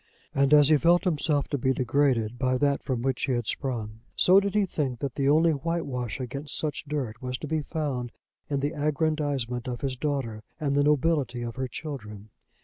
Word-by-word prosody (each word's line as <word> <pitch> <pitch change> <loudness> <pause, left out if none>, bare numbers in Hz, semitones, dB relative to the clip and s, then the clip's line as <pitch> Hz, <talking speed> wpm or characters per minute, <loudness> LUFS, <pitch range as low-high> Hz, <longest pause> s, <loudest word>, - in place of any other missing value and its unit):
And 140 0 +2
as 145 -1 +7
he 155 - +6
felt 170 +4 +4
himself 150 -4 +1
to 145 - -1
be 130 +2 +2
degraded 125 -3 +1
by 130 -1 +2
that 140 +1 +1
from 125 -3 -2
which 135 -1 0
he 130 - 0
had 120 -2 -1
sprung, 110 -3 -3 0.2
so 185 +2 +6
did 200 0 -2
he 210 -1 +4
think 140 -8 -2
that 135 0 -3
the 140 +1 +1
only 160 +3 +5
whitewash 140 -7 -2
against 140 +3 -4
such 150 -1 -3
dirt 135 -7 -4
was 125 0 -3
to 150 - -6
be 155 +1 0
found 140 -6 -3 0.4
in 140 -2 0
the 145 +1 -1
aggrandisement 145 -5 -1
of 120 -2 -4
his 135 -2 -2
daughter 130 -6 -2 0.2
and 140 -3 0
the 145 - +4
nobility 145 -4 +1
of 115 -1 -5
her 130 0 -2
children. 110 -7 -7
140 Hz, 200 wpm, -27 LUFS, 125-150 Hz, 0.4 s, as